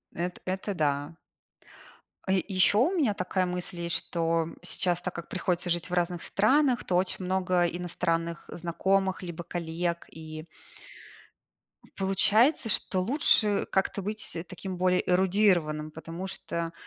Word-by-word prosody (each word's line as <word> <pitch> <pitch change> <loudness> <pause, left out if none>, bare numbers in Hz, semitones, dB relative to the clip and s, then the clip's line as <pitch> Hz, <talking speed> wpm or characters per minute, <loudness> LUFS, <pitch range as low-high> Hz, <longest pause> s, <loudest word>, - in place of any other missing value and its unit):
Эт 175 +1 -3
это 190 +2 -2
да. 145 0 -1 1.1
А, - - +1
е 190 -1 +2
ещё 195 +1 +4
у 280 - +3
меня 275 - +2
такая 185 -1 -1
мысль 180 0 -4
есть, 170 0 -1
что, 165 -1 +1
м, 165 - -9
сейчас, 175 0 -1
так 180 0 -4
как 170 - -7
приходится 180 -1 -1
жить 175 +1 -1
в - - -6
разных 175 -1 0
странах, 255 +4 +3
то 180 - -1
очень 185 +1 0
много 185 -1 +2
иностранных 170 -1 -2
знакомых 190 +3 0
либо 175 -1 -6
коллег. 170 0 -3
И 155 0 -8 1.5
получается, 215 - +3
что 190 -2 +1
лучше 210 -3 +3
как-то 190 +1 0
быть 210 -2 -4
таким 185 0 -6
более 180 0 +2
эрудированным, 180 -5 +2
потому 165 +4 -7
что, 170 -3 -4
180 Hz, 140 wpm, -28 LUFS, 170-190 Hz, 1.5 s, ещё